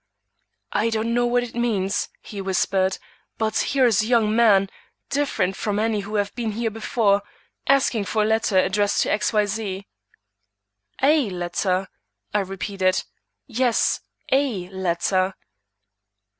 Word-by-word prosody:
"I 215 +3 +2
don't 225 +1 -1
know 240 0 +2
what 245 0 +2
it 240 - -8
means," 210 -5 0
he 200 -2 -7
whispered; 190 0 +1 0.4
"but 220 -1 -1
here 270 -2 +2
is 220 -4 +4
a 215 - -2
young 225 -3 +3
man, 205 -4 +5 0.4
different 275 -10 0
from 205 0 -2
any 220 0 +1
who 205 +2 -5
have 205 -1 0
been 230 -3 -3
here 225 +1 -1
before, 215 -2 +1 0.5
asking 260 -6 +3
for 215 0 +1
a - - +1
letter 220 -2 +1
addressed 200 +2 +2
to - - -1
X. 210 - +1
Y. 210 -2 +3
Z." 200 -2 -4 1.2
"A 285 -4 +4
letter?" 180 +1 -1 0.5
I 210 - +3
repeated. 195 -1 -1 0.4
"Yes, 245 -1 +1 0.3
a 250 -10 +1
letter." 185 0 0
210 Hz, 140 wpm, -23 LUFS, 195-230 Hz, 1.2 s, man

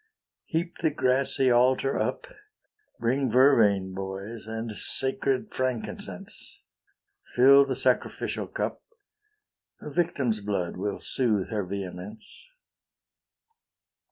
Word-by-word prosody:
Heap 170 +2 -3
the 160 - +2
grassy 130 -2 +2
altar 130 +3 +3
up, - - -2 0.7
Bring 130 +3 +1
vervain, 110 -7 +4
boys, 95 +4 -6
and 110 0 -4
sacred 135 +1 +1
frankincense; 130 -3 -4 0.7
Fill 140 +3 +7
the 135 -1 -2
sacrificial - - -1
cup; - - -4 1.0
A 150 - -8
victim's 140 -9 0
blood 100 -4 -2
will 100 +2 -3
soothe 110 -7 -1
her 105 -2 -1
vehemence. 100 - -8
120 Hz, 95 wpm, -27 LUFS, 100-135 Hz, 1.0 s, Fill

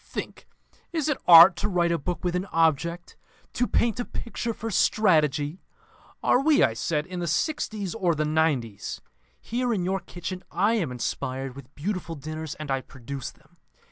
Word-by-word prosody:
Think: - - -7 0.4
Is 315 -3 -1
it 295 - 0
Art 170 +1 +10
to - - -1
write 175 -3 +1
a 170 - 0
book 175 +5 -4
with 180 -1 -1
an 180 +2 -2
object, 165 +1 0 0.4
to 245 - 0
paint 235 -1 +1
a - - 0
picture 235 0 -4
for 225 0 -5
strategy?' 160 -5 +2 0.6
'Are 250 - +4
we,' 300 +1 +4
I 115 - +3
said, 150 +6 -1
'in 180 0 -6
the 170 - -2
sixties 210 - -1
or 180 -7 +1
the 155 +1 0
nineties? 150 -9 -1 0.4
Here, 245 +1 -2
in 190 -6 0
your 190 +1 0
kitchen, 180 +1 -7
I 200 +6 +2
am 180 - 0
inspired 130 +1 -4
with 140 0 -13
beautiful 175 0 -3
dinners, 155 +1 -6
and 155 -2 -6
I 135 0 0
produce 135 0 -7
them. - - -23
170 Hz, 175 wpm, -26 LUFS, 150-200 Hz, 0.6 s, Art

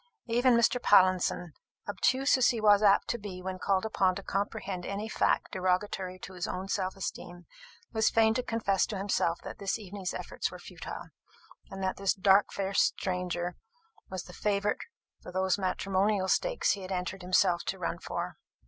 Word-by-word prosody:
Even 240 +1 +3
Mr. 235 +1 +3
Pallinson, 185 -4 +3 0.3
obtuse 260 +6 +2
as 260 -2 +4
he 235 - 0
was 205 -1 +5
apt 200 -1 +4
to 240 - -1
be 195 -3 -7
when 185 0 -5
called 195 +1 +1
upon 190 -4 +2
to 200 - -6
comprehend 195 -2 -3
any 200 +4 -4
fact - - +1
derogatory 185 0 -1
to 185 - -10
his 180 -1 -4
own 185 +1 -4
self 190 -1 -1
esteem, 175 -2 -6 0.5
was 220 -1 +3
fain 220 -1 +4
to 250 - 0
confess 220 -5 0
to 210 - -4
himself 190 -3 0
that - - -8
this 195 -1 -1
evening's 195 -3 -5
efforts - - -3
were - - -9
futile, - - -8 0.6
and 195 0 -6
that 185 - -1
this 195 -1 +1
dark 195 +1 +4
faced 195 0 +1 0.2
stranger 180 -1 -2 0.5
was 185 -2 -5
the - - -13
favourite 205 0 0 0.4
for - - -9
those 190 +1 +1
matrimonial 190 +1 +1
stakes - - +2
he 200 - -2
had 185 0 -7
entered 185 +1 -3
himself 180 -1 +2
to - - -2
run - - -3
for. - - -4
195 Hz, 175 wpm, -30 LUFS, 185-210 Hz, 0.6 s, was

